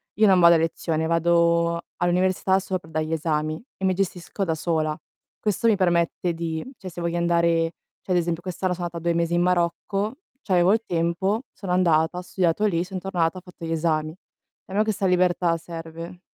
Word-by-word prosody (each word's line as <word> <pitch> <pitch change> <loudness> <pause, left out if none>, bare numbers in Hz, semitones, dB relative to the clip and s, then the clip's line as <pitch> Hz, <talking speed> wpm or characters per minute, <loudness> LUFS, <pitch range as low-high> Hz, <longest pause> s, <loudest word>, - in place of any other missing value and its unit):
io 215 - +4
non 190 -3 +6
vado 170 -1 +7
a - - +5
lezione, 160 0 -1
vado 170 0 +2 0.2
all'università 185 +2 +2
solo 190 -1 -2
per 160 - -17
dare 155 0 -1
gli 160 - -3
esami 155 0 -1
e 190 - -2
mi 185 - +3
gestisco 190 +1 -3
da 165 -3 0
sola. 155 -1 -1 0.4
Questo 210 +2 0
mi 220 - +5
permette 175 -2 +1
di, 165 +1 -4
cioè 190 - -7
se 175 - -9
voglio 170 0 -1
andare 170 -1 +2 0.3
cioè 185 - -2
ad - - +3
esempio, 170 -1 -1
quest'anno 185 0 -2
sono 175 0 -4
andata 170 -1 -8
2 170 - +2
mesi 170 0 0
in 175 - +3
Marocco, 180 +5 0 0.3
ch'avevo 185 -3 +3
il 225 - +1
tempo, 175 +7 0
sono 190 -3 -6
andata, 170 -2 +3
ho 180 - -3
studiato 180 +2 0
lì, 175 -4 +1
sono 185 0 -6
tornata, 180 -2 -1
ho - - -7
fatto 180 -2 -14
gli 165 - -3
esami. 155 -1 0 0.5
A 190 - -11
me 210 - +3
questa 215 -3 0
libertà 180 -2 +2
serve. 165 +1 -8
170 Hz, 200 wpm, -24 LUFS, 165-185 Hz, 0.5 s, vado